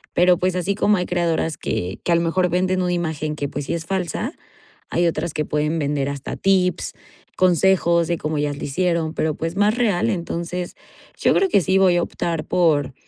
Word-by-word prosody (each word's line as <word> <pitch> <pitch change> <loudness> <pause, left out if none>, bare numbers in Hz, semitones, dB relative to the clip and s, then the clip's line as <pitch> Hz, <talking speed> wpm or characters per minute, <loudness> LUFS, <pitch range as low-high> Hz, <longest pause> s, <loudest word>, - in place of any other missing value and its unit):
Pero, 180 0 +5
pues, 185 0 0
así 185 +2 -1
como 210 -1 +3
hay 180 - -1
creadoras 165 -3 0
que 90 +2 -3
que 175 - -1
a - - +5
lo 170 - +2
mejor 180 +2 +1
venden 185 +1 +1
una 180 0 0
imagen 155 -3 -2
que, 145 -2 -3
pues, 145 0 -5
sí - - -2
es 165 -1 -4
falsa, 190 - -2 0.6
hay 175 0 +2
otras 160 0 -2
que 150 - -1
pueden 150 +2 -1
vender 140 -1 -1
hasta 140 -1 -5
tips, 185 -2 +1 0.4
consejos 175 -2 +3
de 170 -1 0
cómo 155 0 -2
ellas 145 -1 -1
lo - - -7
hicieron, 170 +1 0
pero, 155 -1 0
pues, 165 +3 -4
más 205 +2 +3
real. 230 -4 +1
Entonces 175 0 -4 0.4
yo - - +3
creo 390 -1 +2
que 200 - +4
sí 190 +3 +2
voy 185 -2 +4
a 175 - +2
optar 165 -3 -3
por, 155 -7 +2
170 Hz, 205 wpm, -21 LUFS, 155-185 Hz, 0.6 s, Pero